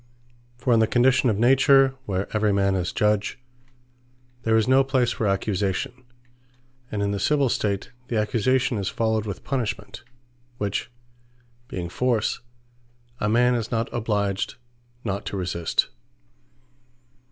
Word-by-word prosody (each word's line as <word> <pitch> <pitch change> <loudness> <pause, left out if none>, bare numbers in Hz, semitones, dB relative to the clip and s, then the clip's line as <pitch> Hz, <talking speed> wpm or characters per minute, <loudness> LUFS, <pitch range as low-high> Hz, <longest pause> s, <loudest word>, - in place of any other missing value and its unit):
For 125 0 +1
in 115 - +5
the 110 - +4
condition 125 +2 +3
of 105 - 0
Nature, 135 +3 +5
where 95 -1 -1
every 105 -1 +2
man 100 -1 +2
is 90 -2 -1
Judge, 105 -1 +1 1.0
there 110 -2 +2
is 110 - +2
no 130 +1 +5
place 130 -3 +1
for 110 - -1
Accusation: 100 +5 -1 0.9
and 105 -1 -1
in 100 - 0
the 100 - -2
Civill 140 +4 +2
State, 100 -3 -1 0.2
the 120 - -1
Accusation 115 +2 +1
is 95 - -2
followed 110 -1 0
with 100 - -6
Punishment; 125 -5 -3 0.5
which 105 0 -2 0.8
being 90 -7 -4
Force, 115 +4 0 0.8
a 105 - 0
man 125 +3 +4
is 115 -2 -2
not 115 0 -2
obliged 100 -4 -1 0.5
not 100 -2 -3
to 100 - -3
resist. 85 -3 0
110 Hz, 135 wpm, -24 LUFS, 100-125 Hz, 1.0 s, in